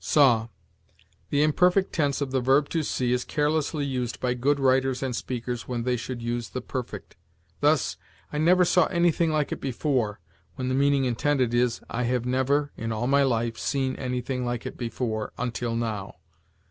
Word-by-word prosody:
SAW. 120 Hz, -7 st, +4 dB, 0.8 s
The 145 Hz, 0 st, +3 dB
imperfect 180 Hz, +5 st, +3 dB
tense 145 Hz, -4 st, 0 dB
of 140 Hz, -2 st, -2 dB
the 130 Hz, -1 st, +1 dB
verb 135 Hz, +3 st, +3 dB
to 165 Hz, -, 0 dB
see 125 Hz, -4 st, -1 dB
is 125 Hz, -, 0 dB
carelessly 150 Hz, 0 st, 0 dB
used 125 Hz, -3 st, -3 dB
by 125 Hz, -1 st, 0 dB
good 140 Hz, +4 st, +1 dB
writers 130 Hz, 0 st, +2 dB
and 130 Hz, -2 st, -2 dB
speakers 120 Hz, 0 st, -4 dB
when 120 Hz, -2 st, -2 dB
they 125 Hz, 0 st, +1 dB
should 120 Hz, 0 st, -5 dB
use 120 Hz, 0 st, -2 dB
the 130 Hz, -, -4 dB
perfect; 125 Hz, 0 st, -6 dB, 0.4 s
thus, 145 Hz, -1 st, +2 dB, 0.4 s
"I 150 Hz, -, -1 dB
never 180 Hz, +3 st, +5 dB
saw 180 Hz, 0 st, +4 dB
anything 170 Hz, -1 st, +2 dB
like 155 Hz, -2 st, 0 dB
it -, -, -4 dB
before," 125 Hz, -5 st, -1 dB, 0.4 s
when 130 Hz, -1 st, -3 dB
the -, -, 0 dB
meaning 140 Hz, 0 st, +3 dB
intended 125 Hz, 0 st, +1 dB
is, 120 Hz, -1 st, +1 dB
"I 125 Hz, +1 st, -2 dB
have 125 Hz, 0 st, 0 dB
never 135 Hz, +3 st, +1 dB
[in 115 Hz, +1 st, -4 dB
all 110 Hz, +2 st, -2 dB
my 140 Hz, +2 st, +4 dB
life] 115 Hz, -4 st, 0 dB
seen 130 Hz, -2 st, -1 dB
anything 125 Hz, 0 st, -2 dB
like 120 Hz, -1 st, -3 dB
it -, -, -5 dB
before 115 Hz, -3 st, -3 dB
[until 120 Hz, -1 st, -2 dB
now]." 110 Hz, -4 st, -3 dB
130 Hz, 180 wpm, -26 LUFS, 120-145 Hz, 0.8 s, never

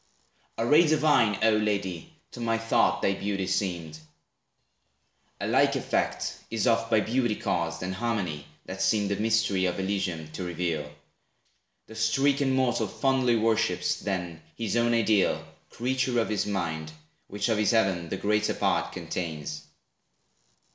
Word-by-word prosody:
A 115 Hz, -, 0 dB
ray 155 Hz, +7 st, +5 dB
divine, 145 Hz, -9 st, +3 dB
O 110 Hz, -, +5 dB
lady! 100 Hz, -5 st, -1 dB, 0.2 s
to -, -, -10 dB
my 115 Hz, -1 st, 0 dB
thought 115 Hz, 0 st, +1 dB
Thy 100 Hz, -, +3 dB
beauty 100 Hz, -1 st, -2 dB
seemed. 90 Hz, -5 st, -2 dB, 1.4 s
A -, -, -3 dB
like -, -, +3 dB
effect -, -, -1 dB
is 115 Hz, -3 st, -1 dB
oft 115 Hz, -1 st, +2 dB
By 110 Hz, -2 st, +4 dB
beauty 120 Hz, -1 st, 0 dB
caused, 85 Hz, -2 st, -2 dB
and 95 Hz, +1 st, -3 dB
harmony, 95 Hz, -9 st, -2 dB, 0.2 s
that 95 Hz, 0 st, -6 dB
seem 105 Hz, 0 st, +2 dB
The 100 Hz, -, 0 dB
mystery 110 Hz, -4 st, +1 dB
of 90 Hz, +2 st, -1 dB
Elysium 95 Hz, -5 st, -2 dB
to 90 Hz, -, -5 dB
reveal. 85 Hz, -4 st, -3 dB, 0.9 s
The -, -, -13 dB
stricken 135 Hz, +5 st, +2 dB
mortal 130 Hz, -2 st, +1 dB
fondly 130 Hz, -3 st, +1 dB
worships, 115 Hz, -1 st, +1 dB
then, 90 Hz, -5 st, -4 dB, 0.2 s
His 115 Hz, -2 st, -2 dB
own 120 Hz, 0 st, +3 dB
ideal, 100 Hz, -8 st, +2 dB, 0.2 s
creature 130 Hz, 0 st, 0 dB
of 115 Hz, -, 0 dB
his 105 Hz, -1 st, -1 dB
mind, 80 Hz, -6 st, -3 dB, 0.4 s
Which 105 Hz, +2 st, -2 dB
of 110 Hz, -2 st, +1 dB
his 105 Hz, -, +2 dB
heaven 95 Hz, -7 st, +1 dB
the 95 Hz, -, -3 dB
greater 105 Hz, +2 st, +1 dB
part -, -, 0 dB
contains. 75 Hz, -4 st, -5 dB
105 Hz, 145 wpm, -27 LUFS, 90-115 Hz, 1.4 s, ray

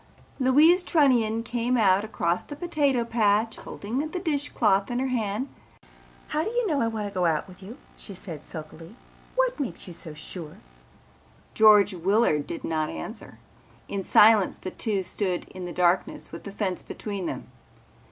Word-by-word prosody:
Louise 300 Hz, +8 st, +5 dB
Trunnion 245 Hz, -10 st, +2 dB
came 240 Hz, +1 st, 0 dB
out 195 Hz, -3 st, +4 dB
across 180 Hz, -5 st, -1 dB
the 290 Hz, -, -9 dB
potato 290 Hz, -6 st, +1 dB
patch 225 Hz, -1 st, +1 dB
holding 220 Hz, +6 st, -5 dB
the 310 Hz, +5 st, -3 dB
dish 295 Hz, -5 st, -1 dB
cloth 200 Hz, -5 st, +2 dB
in 240 Hz, -, -2 dB
her 260 Hz, +1 st, 0 dB
hand. 225 Hz, 0 st, -1 dB, 0.8 s
"How 310 Hz, +1 st, 0 dB
do 425 Hz, -, -2 dB
you 480 Hz, +1 st, 0 dB
know 305 Hz, -8 st, +1 dB
I 230 Hz, -, +2 dB
want 220 Hz, -2 st, -3 dB
to 200 Hz, -, -9 dB
go 180 Hz, -2 st, +1 dB
out 160 Hz, +1 st, 0 dB
with 185 Hz, +1 st, -15 dB
you," 215 Hz, +7 st, -10 dB, 0.2 s
she 200 Hz, -, -10 dB
said 165 Hz, -5 st, -8 dB
sulkily. 165 Hz, +4 st, -10 dB, 0.4 s
"What -, -, +1 dB
makes 275 Hz, -5 st, -4 dB
you 175 Hz, -, -8 dB
so 165 Hz, -2 st, -10 dB
sure?" 155 Hz, 0 st, -8 dB, 1.0 s
George 210 Hz, -2 st, +6 dB
Willard 180 Hz, -4 st, +2 dB
did 170 Hz, -, -5 dB
not 155 Hz, -1 st, -1 dB
answer. 80 Hz, -1 st, -8 dB, 0.5 s
In 200 Hz, -, -3 dB
silence 210 Hz, 0 st, +5 dB
the 185 Hz, -, -6 dB
two 205 Hz, -4 st, -1 dB
stood 185 Hz, 0 st, -2 dB
in 185 Hz, -1 st, -8 dB
the 175 Hz, -, -5 dB
darkness 180 Hz, +1 st, 0 dB
with -, -, -9 dB
the 200 Hz, -, -6 dB
fence 195 Hz, -2 st, -2 dB
between 200 Hz, -4 st, -5 dB
them. -, -, -6 dB
210 Hz, 170 wpm, -26 LUFS, 185-255 Hz, 1.0 s, George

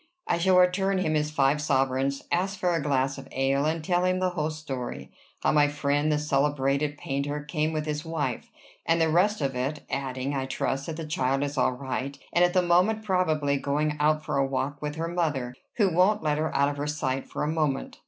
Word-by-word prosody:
I -, -, 0 dB
shall 185 Hz, +1 st, +4 dB
return 190 Hz, +2 st, +3 dB
him 160 Hz, -4 st, 0 dB
his 150 Hz, -1 st, +1 dB
five 145 Hz, 0 st, +2 dB
sovereigns, 135 Hz, -1 st, 0 dB
ask 190 Hz, +3 st, 0 dB
for 180 Hz, -1 st, +1 dB
a 165 Hz, -, 0 dB
glass 135 Hz, -1 st, 0 dB
of -, -, -10 dB
ale, 135 Hz, +2 st, +1 dB
and 160 Hz, +1 st, -1 dB
tell 175 Hz, +2 st, +1 dB
him 185 Hz, 0 st, +2 dB
the 185 Hz, 0 st, 0 dB
whole 155 Hz, -3 st, -1 dB
story, 130 Hz, -, -6 dB, 0.3 s
how -, -, +3 dB
my 150 Hz, -1 st, +4 dB
friend, 145 Hz, +1 st, 0 dB
the 150 Hz, -, +2 dB
celebrated 145 Hz, 0 st, 0 dB
painter, 140 Hz, +2 st, -3 dB
came 155 Hz, +1 st, -1 dB
with 155 Hz, -1 st, -2 dB
his 150 Hz, 0 st, -3 dB
wife, 155 Hz, -6 st, -3 dB, 0.3 s
and 165 Hz, +1 st, +2 dB
the 165 Hz, -1 st, +3 dB
rest 190 Hz, +4 st, +2 dB
of 135 Hz, -2 st, -1 dB
it, 135 Hz, +4 st, -3 dB
adding, 130 Hz, 0 st, -2 dB
I 135 Hz, -1 st, -2 dB
trust, 135 Hz, +1 st, -2 dB
that 160 Hz, -1 st, -4 dB
the 165 Hz, -, -5 dB
child 135 Hz, -2 st, 0 dB
is 145 Hz, 0 st, -3 dB
all 130 Hz, -1 st, +2 dB
right, 135 Hz, +1 st, -4 dB, 0.2 s
and 175 Hz, -, +4 dB
at 175 Hz, 0 st, +3 dB
the 185 Hz, -, +4 dB
moment 185 Hz, +6 st, +3 dB
probably 155 Hz, -8 st, +1 dB
going 150 Hz, +2 st, 0 dB
out 155 Hz, +1 st, +2 dB
for -, -, -1 dB
a 135 Hz, -, +2 dB
walk 135 Hz, +2 st, -3 dB
with 150 Hz, 0 st, -3 dB
her 165 Hz, +1 st, -2 dB
mother, 150 Hz, -8 st, -1 dB, 0.2 s
who 200 Hz, -6 st, +2 dB
won't 190 Hz, +5 st, +3 dB
let 150 Hz, -1 st, +1 dB
her 160 Hz, -, -1 dB
out 140 Hz, +1 st, +3 dB
of 145 Hz, -, -5 dB
her 145 Hz, +1 st, -2 dB
sight 135 Hz, -3 st, -2 dB
for -, -, -4 dB
a -, -, 0 dB
moment." 150 Hz, -4 st, -1 dB
150 Hz, 220 wpm, -27 LUFS, 140-165 Hz, 0.3 s, shall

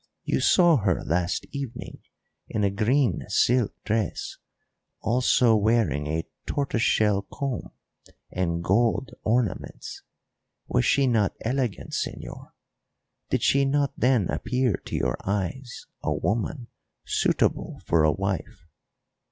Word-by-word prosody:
You -, -, 0 dB
saw 175 Hz, -4 st, +5 dB
her 95 Hz, -6 st, 0 dB
last 90 Hz, +2 st, -1 dB
evening 140 Hz, -4 st, -6 dB, 0.5 s
in 105 Hz, -, -2 dB
a 100 Hz, -, +2 dB
green 110 Hz, -, +1 dB
silk 120 Hz, -3 st, +2 dB
dress, 110 Hz, -1 st, -2 dB, 0.6 s
also 120 Hz, 0 st, +3 dB
wearing 105 Hz, -, +1 dB
a 80 Hz, +2 st, -2 dB, 0.2 s
tortoise 140 Hz, -5 st, -1 dB
shell 105 Hz, -3 st, +3 dB
comb 135 Hz, -4 st, -3 dB, 0.6 s
and 85 Hz, -2 st, -1 dB
gold 115 Hz, +7 st, +1 dB
ornaments 115 Hz, 0 st, -2 dB, 0.7 s
was -, -, +1 dB
she 140 Hz, -, +3 dB
not 115 Hz, -6 st, +2 dB
elegant, 125 Hz, -2 st, -2 dB
señor? -, -, -5 dB, 0.8 s
Did -, -, 0 dB
she 140 Hz, 0 st, +4 dB
not 140 Hz, +1 st, +1 dB
then 125 Hz, -7 st, +2 dB
appear 125 Hz, -2 st, 0 dB
to -, -, -5 dB
your -, -, 0 dB
eyes 105 Hz, +6 st, -3 dB, 0.2 s
a -, -, -1 dB
woman 115 Hz, +3 st, -2 dB, 0.4 s
suitable -, -, 0 dB
for 80 Hz, -2 st, +3 dB
a 80 Hz, -, +5 dB
wife? 95 Hz, +1 st, -4 dB
115 Hz, 120 wpm, -26 LUFS, 95-130 Hz, 0.8 s, saw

